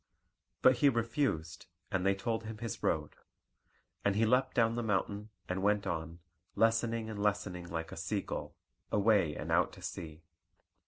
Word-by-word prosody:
But 130 -1 +7
he 145 - +5
refused, 115 - -1 0.2
and 95 -2 0
they 100 0 +3
told 115 +3 -2
him 110 0 -6
his 115 -1 -5
road. 75 -2 -1 0.9
And 100 -1 +2
he 110 +2 +3
leapt 125 +4 +2
down 115 -2 +4
the 120 - -1
mountain, 105 -1 -1 0.2
and 90 +1 -2
went 105 0 +2
on, 80 0 -4 0.3
lessening 115 0 +2
and 105 -2 -5
lessening 100 -4 -1
like 80 0 -4
a - - -6
sea - - -1
gull, - - -5 0.4
away 100 -7 +3
and - - -5
out - - +3
to - - -12
sea. 80 0 -6
105 Hz, 165 wpm, -33 LUFS, 90-115 Hz, 0.9 s, But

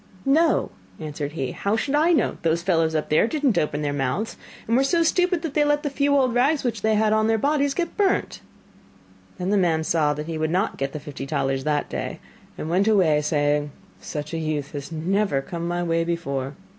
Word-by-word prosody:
'No,' 315 +5 +3 0.3
answered 150 -2 -5
he, 135 -5 -3
'how 200 +2 -1
should 270 +5 -2
I 310 +4 +4
know? 330 - +1
Those 165 +1 0
fellows 165 -3 +1
up 155 - -1
there 155 +8 +4
did 300 +3 -4
not 235 -11 +3
open 150 0 -1
their 145 -1 -1
mouths, 145 - -2 0.3
and 230 - +2
were 265 - +4
so 335 +4 +2
stupid 360 0 +1
that 320 -4 -3
they 300 - +3
let 295 0 +1
the 290 - -2
few 285 0 +2
old 255 -3 +2
rags 275 +5 +2
which 230 -4 -2
they 220 0 +2
had 215 0 +2
on 215 0 +2
their 225 0 +2
bodies 285 +2 +1
get 345 -1 -2
burnt.' 400 -2 0 1.0
Then 185 +1 -2
the 205 - +3
man 165 -4 +2
saw 155 -2 +1
that 150 +1 -5
he 160 -1 -4
would 155 0 0
not 185 +5 0
get 135 0 -3
the 150 - -4
fifty 140 -2 -7
talers 135 -2 -1
that 150 -1 0
day, - - -5 0.4
and - - -5
went 185 +5 +2
away 175 -9 +4
saying: 145 -1 0 0.3
'Such 150 +1 -6
a 165 - -1
youth 155 -3 -3
has 145 +2 -7
never 175 0 0
come 170 +4 -5
my 175 0 -1
way 165 -1 +1
before. 140 -5 -3
170 Hz, 220 wpm, -23 LUFS, -, 1.0 s, I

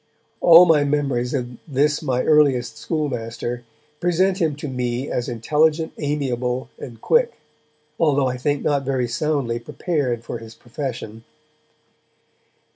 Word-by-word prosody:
(All 170 +1 +8
my 155 -4 +4
memories 140 -3 0
of 125 -2 -4
this 150 +1 +1
my 130 -5 0
earliest 140 -6 +3
schoolmaster 120 -5 -3 0.4
present 185 +2 +1
him 160 -5 +1
to 150 +1 -6
me 125 0 -3
as 125 +1 -2
intelligent, 155 +7 +1
amiable 130 -4 -2
and 115 -4 -9
quick, 475 - +2 0.7
although 145 -4 +3
I 125 0 -1
think 145 +2 -1
not 145 -2 +1
very 130 -2 -1
soundly 125 -2 -1
prepared 125 -3 -2
for 115 - -6
his 115 0 -12
profession.) 120 -3 -6
135 Hz, 125 wpm, -22 LUFS, 120-150 Hz, 0.7 s, All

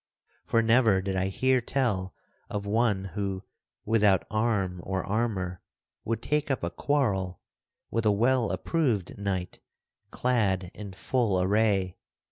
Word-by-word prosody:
For 115 - +2
never 115 -3 +4
did 95 0 -3
I 95 0 +1
hear 130 +6 +2
tell 105 -8 -1 0.3
of 100 -1 -3
one 105 -2 +1
who, 95 -1 -3 0.4
without 105 -4 +3
arm 105 -5 0
or 95 -1 -2
armor, 100 -4 -2 0.4
would 115 0 -2
take 150 0 0
up 135 -8 -1
a 85 - -1
quarrel 95 - 0 0.5
with 115 -1 +1
a - - +5
well 120 +2 +2
approved 125 - -1
knight 95 -3 -3 0.5
clad 100 -8 0
in 100 -2 -8
full 110 -2 0
array. 95 -1 +1
105 Hz, 130 wpm, -28 LUFS, 95-115 Hz, 0.5 s, a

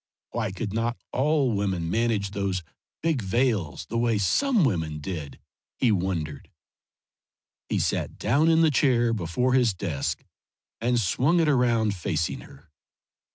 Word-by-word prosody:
Why 110 -4 -2
could 100 +1 -4
not 115 +2 -1 0.2
all 140 -1 +2
women 95 -5 -1
manage 110 -3 0
those 100 -3 -2 0.4
big 160 -6 +1
veils 105 - 0
the 115 - -2
way 115 -2 +2
some 220 - +2
women 80 - -1
did, 75 -2 -6 0.4
he 125 - +3
wondered. 85 -7 -2 1.2
He - - 0
sat - - -1
down 145 +9 +2
in 165 0 +4
the 160 -2 +4
chair 120 -5 +3
before 110 +6 0
his 120 -6 +3
desk, 80 -7 -3 0.6
and 120 +1 +1
swung 130 - +2
it 165 - +3
around 120 -6 +2
facing 85 -3 -2
her. 75 +3 -16
110 Hz, 140 wpm, -26 LUFS, 95-125 Hz, 1.2 s, in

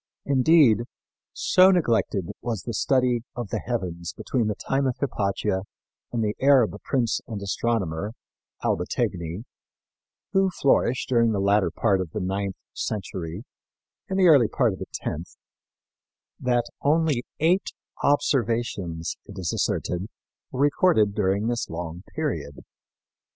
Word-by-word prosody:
Indeed, 135 -4 +5 0.5
so 185 +1 +5
neglected 115 - +1
was 115 -5 -3
the 115 - -4
study 125 +1 +2
of 120 -4 -4
the - - -1
heavens 85 -8 -4
between 120 -5 -1
the 105 - -1
time 135 +5 0
of 125 - -2
Hypatia 100 -6 -1 0.5
and 115 -2 -1
the 105 -1 0
Arab 130 -6 +5
prince 120 -4 0
and 110 -3 -5
astronomer, 100 -2 -1 0.5
Albategni, 85 +4 -1 0.9
who 195 -1 +4
flourished 135 -6 +1
during 115 -4 +3
the 100 - 0
latter 100 -1 +3
part 95 +4 +1
of 85 -4 -6
the - - -2
ninth 95 +1 -2 0.2
century 95 -2 -4 0.7
and 190 - -1
the 190 - +4
early 140 -8 +7
part 120 -5 +1
of 95 - -9
the - - -6
tenth, 80 +4 -5 1.0
that 120 -1 +1 0.2
only 150 -3 +2 0.2
eight 175 +5 +2 0.3
observations, 115 - 0
it 100 - -11
is 90 -4 -2
asserted, 90 +3 -1 0.4
were 130 - -3
recorded 145 - +3
during 100 0 +1
this 120 0 -1
long 85 +1 -5
period. 100 - -3
115 Hz, 130 wpm, -25 LUFS, 95-135 Hz, 1.0 s, early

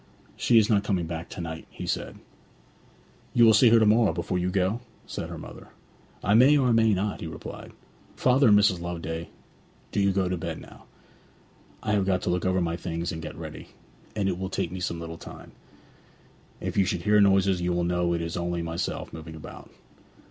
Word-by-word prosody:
'She 120 - +3
is 110 -2 +5
not 105 -2 +2
coming 95 -4 0
back 80 0 -6
to - - -8
night,' 80 -1 -6
he - - -8
said. - - -3 1.2
'You 120 - +7
will 110 - +7
see 115 +3 +6
her 115 - +6
to 110 - +4
morrow 110 -1 +4
before 85 +2 -2
you 90 +1 0
go?' 95 +4 0 0.3
said - - -6
her - - -7
mother. - - -10 0.6
'I 100 - +2
may 130 +6 +6
or 130 -3 +2
I - - +3
may 115 -1 +4
not,' 100 +2 -2
he 85 - -4
replied. 80 - -8 0.4
'Father 130 +1 +4
and 105 -2 +7
Mrs. 100 -4 +3
Loveday, 85 -1 -5 0.6
do - - -1
you 100 0 +3
go 95 -1 +1
to 90 0 -1
bed - - -4
now. - - -14 1.0
I 110 - -1
have 100 -2 +1
got 95 -1 +1
to - - 0
look 90 0 -1
over 95 0 +2
my 85 -1 -1
things 85 -1 -4
and 80 - -6
get 80 - -7
ready; - - -8 0.5
and 100 -2 0
it 90 -2 -1
will 95 0 -3
take - - -2
me 95 - -5
some 85 -2 -3
little 85 0 -7
time. - - -11 1.1
If - - -4
you 100 - +4
should 90 -1 -2
hear 105 +2 +4
noises 95 -2 +3
you 90 0 0
will 85 0 0
know 90 0 +1
it 85 - -2
is 85 0 -4
only 85 -1 -2
myself 80 +1 -4
moving 80 0 -8
about.' 80 - -11
90 Hz, 215 wpm, -26 LUFS, 85-105 Hz, 1.2 s, You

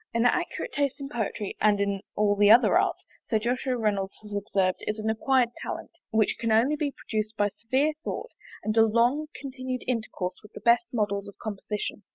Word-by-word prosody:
An 230 +1 +3
accurate 355 - 0
taste 280 -1 0
in 275 -1 -6
poetry, 220 -5 -3
and 210 -1 +4
in 200 -1 0
all 205 -1 +3
the 205 0 +5
other 235 +4 +7
arts, - - +1 0.2
Sir 225 - +3
Joshua 250 +3 -1
Reynolds 200 -4 -1
has 210 -1 -9
observed, 195 -2 0
is 210 - -1
an 220 0 0
acquired 245 +1 +2
talent, - - -5 0.2
which 220 -1 +2
can 230 -1 0
only 235 +7 +4
be 295 -1 -1
produced 215 -3 -4
by 205 0 +2
severe 260 +9 0
thought, 485 - -4 0.3
and 215 0 -1
a - - +8
long 240 +7 +2
continued 255 -2 -5
intercourse 220 -6 -2
with 210 - -16
the - - -8
best 235 0 +4
models 205 -3 -1
of 200 - -11
composition. 210 0 -4
225 Hz, 195 wpm, -27 LUFS, 210-255 Hz, 0.3 s, a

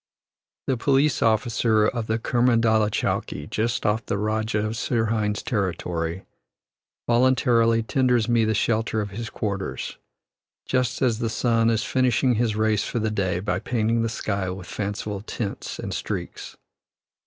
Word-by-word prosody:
The 130 - 0
police 140 +3 +2
officer 110 -1 +2
of 115 0 -1
Kermandalah 115 -1 +2
chowkee, 75 -7 -2
just 115 +3 -1
off 110 +1 +1
the 100 - -2
Rajah 110 0 -1
of 110 - -2
Sirhind's 110 -3 0
territory, 90 -4 -2 0.8
voluntarily 120 -2 +3
tenders 125 -2 +2
me 120 -1 +3
the 110 0 +1
shelter 110 +1 0
of 105 -2 -3
his 110 +2 -5
quarters, 100 -3 -4 0.7
just 125 -1 0
as 115 -3 +2
the 115 -2 -1
sun 115 0 +2
is 110 -2 +1
finishing 130 +1 +2
his 115 -2 0
race 110 -1 +1
for - - -3
the 110 -1 0
day 95 -4 0
by 100 +3 -1
painting 115 -1 0
the 115 - 0
sky 100 -4 -2
with 90 -1 -6
fanciful 100 +1 -4
tints 105 -1 -5
and - - -5
streaks. - - -5
110 Hz, 140 wpm, -24 LUFS, 105-120 Hz, 0.8 s, voluntarily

